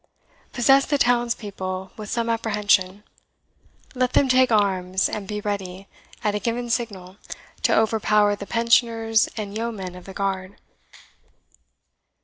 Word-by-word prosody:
Possess 270 +3 +4
the 290 - +1
townspeople 205 -7 -1
with 210 -2 -8
some 235 -1 -1
apprehension; 210 -4 +1 0.9
let 255 -1 0
them 275 - +4
take 255 -1 +4
arms, 190 -3 +1
and 205 -2 -5
be 210 0 -4
ready, 195 -2 -5 0.4
at 210 - +1
a 210 - -1
given 235 +2 -2
signal, 200 -6 -3 0.4
to - - +3
overpower 210 -2 +2
the 200 0 -9
Pensioners 230 -1 +2
and 205 -2 -5
Yeomen 215 -5 -4
of 180 0 -12
the 195 - -9
Guard." 195 -1 -3
210 Hz, 130 wpm, -23 LUFS, 195-235 Hz, 0.9 s, Possess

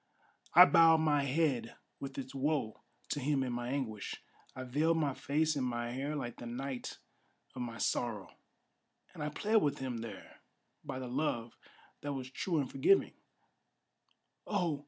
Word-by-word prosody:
I 180 +2 +12
bowed 165 -2 +7
my 145 -3 +3
head 135 -5 0 0.2
with 135 0 -6
its 130 -1 -5
woe 135 -5 -1 0.3
to 145 - -1
him 140 0 +1
in 125 -2 -2
my 120 0 -3
anguish; 125 -7 -3 0.4
I 130 - -5
veiled 150 +6 +2
my 145 -4 +1
face 155 +4 +1
in 140 - -1
my 120 -1 -2
hair 140 +4 -3
like 120 -5 -4
the 120 - -7
night 130 +2 -5 0.6
of 125 - -6
my 115 -2 -4
sorrow; 115 -6 -1 0.8
And - - -9
I 150 - -1
plead 215 +8 +1
with 145 -8 +2
him 130 -3 -3
there 115 0 -9 0.4
by - - -5
the 130 -1 -5
love 120 -3 -1 0.5
that 145 0 -3
was 130 -1 -5
true 170 +4 -1
and 140 -3 +1
forgiving: 390 +3 +3 1.3
Oh! 175 -8 0
135 Hz, 160 wpm, -33 LUFS, 125-150 Hz, 1.3 s, I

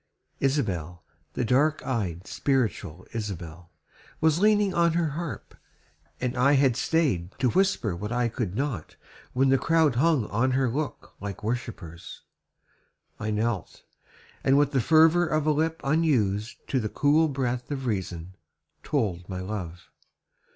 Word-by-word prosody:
Isabel, 90 - -1 0.3
The 125 - -1
dark 145 +6 +2
eyed, 95 -8 -2
spiritual 105 - -1
Isabel 90 -6 -6 0.5
Was 160 0 +3
leaning 210 -1 +3
on 170 -1 +3
her 165 -2 +1
harp, 165 +2 -6 0.7
and 125 0 -2
I 135 +3 +4
had 135 -3 +4
staid 125 - 0
To 125 -3 +1
whisper 190 - +1
what 105 +5 -5
I 120 0 +1
could 110 -5 -3
not 125 - -3 0.4
when 135 +2 +3
the 135 0 +4
crowd 160 -6 +2
Hung 150 -4 +3
on 125 +5 +1
her 130 0 +2
look 150 +4 -4
like 100 0 -6
worshippers. 105 -8 -5 1.0
I 105 - -3
knelt, 110 -3 -2 0.6
And 135 +1 +4
with 145 -1 +3
the 135 -3 +2
fervor 160 +5 +5
of 155 -1 0
a 155 - +4
lip 160 +2 0
unused 125 -9 0
To 130 - +1
the 110 -3 -2
cool 150 +6 +3
breath 125 -3 -2
of 135 -2 -4
reason, 95 -5 -3 0.5
told 100 - -2
my 95 -1 -4
love. 90 -3 -6
125 Hz, 145 wpm, -26 LUFS, 100-150 Hz, 1.0 s, fervor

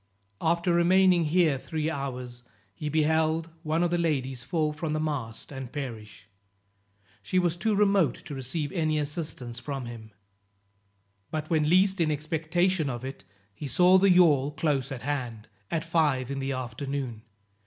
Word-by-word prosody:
After 170 +2 +2
remaining 180 0 +4
here 155 -3 +3
three 155 +2 -3
hours, 125 -5 -4 0.3
he 150 +9 -4
beheld 160 +1 +1
one 160 +1 0
of 175 - +1
the 175 - +1
ladies 135 -6 -1
fall 155 +2 -1
from 155 0 -3
the 155 - 0
mast 140 -8 -4
and 135 -3 -7
perish. 115 -8 -7 0.9
She 185 - -2
was 175 -2 +2
too 205 +5 0
remote 195 - +3
to 145 - -7
receive 135 +3 -3
any 155 -4 0
assistance 145 -5 -4
from 135 -1 -5
him. 115 -2 -9 1.2
But 155 0 -4
when 155 -2 +2
least 190 +1 +4
in 160 - +2
expectation 160 +2 0
of 120 0 -5
it, 135 -7 -7 0.3
he 140 +8 -6
saw 180 +6 +5
the 195 +1 +4
yawl 155 -7 +5
close 150 -3 -1
at 130 -3 -6
hand, 125 -6 -3 0.2
at 160 -2 -1
five 150 -6 +1
in 140 - -3
the 135 0 -2
afternoon. 130 -1 -4
150 Hz, 155 wpm, -27 LUFS, 135-170 Hz, 1.2 s, saw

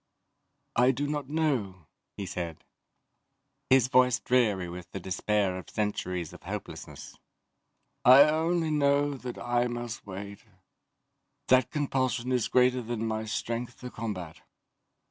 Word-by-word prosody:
"I 125 +2 +5
do 135 +2 0
not 145 -2 -3
know," 125 - -1 0.3
he 100 - -4
said, 85 -4 -5 1.1
his 130 -2 +5
voice 125 -1 +4
dreary 105 -8 +2
with 85 0 -8
the 95 - -5
despair 95 +1 0
of - - -12
centuries 90 -5 -2
of - - -12
hopelessness. - - -8 0.8
"I 130 +3 +9
only 160 +2 +1
know 145 -1 +2
that 125 -2 -7
I 120 0 0
must 120 -2 -6
wait 100 +1 -7 1.1
that 130 -1 +5
compulsion 130 -4 -1
is 125 -3 +1
greater 125 0 +3
than 115 -1 -3
my 110 0 -2
strength 115 +3 -4
to 125 -1 -7
combat." 95 -8 -6
120 Hz, 125 wpm, -28 LUFS, 100-130 Hz, 1.1 s, I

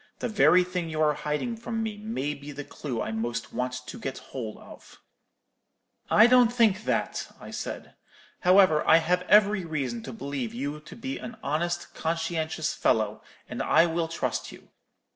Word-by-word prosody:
The - - -2
very 185 -4 +5
thing 180 -2 -3
you 155 -1 -4
are 150 -1 +4
hiding 150 +12 -2
from 225 0 -3
me 220 -1 -3
may 210 - -3
be 145 0 -9
the 145 +1 -6
clue 130 -5 -4
I - - -4
most 115 +2 -3
want 125 0 -2
to - - -8
get 135 - -4
hold 115 -5 -7
of.' - - -15 1.1
"'I 215 - +7
don't 245 -1 +6
think 220 -4 +2
that,' - - -1
I - - -10
said. - - -6 0.5
'However, 180 -4 +5
I 160 - +8
have 175 +2 +1
every 210 -2 +5
reason 135 -8 -3
to 130 - -7
believe 130 -1 -4
you 145 +4 -3
to 150 - -12
be 265 +3 -5
an 230 0 -8
honest, 175 +4 -2
conscientious 160 -1 -2
fellow, 110 -1 +1 0.3
and - - -5
I - - +5
will 165 0 -1
trust 165 - -3
you. - - -15
160 Hz, 175 wpm, -27 LUFS, 140-205 Hz, 1.1 s, I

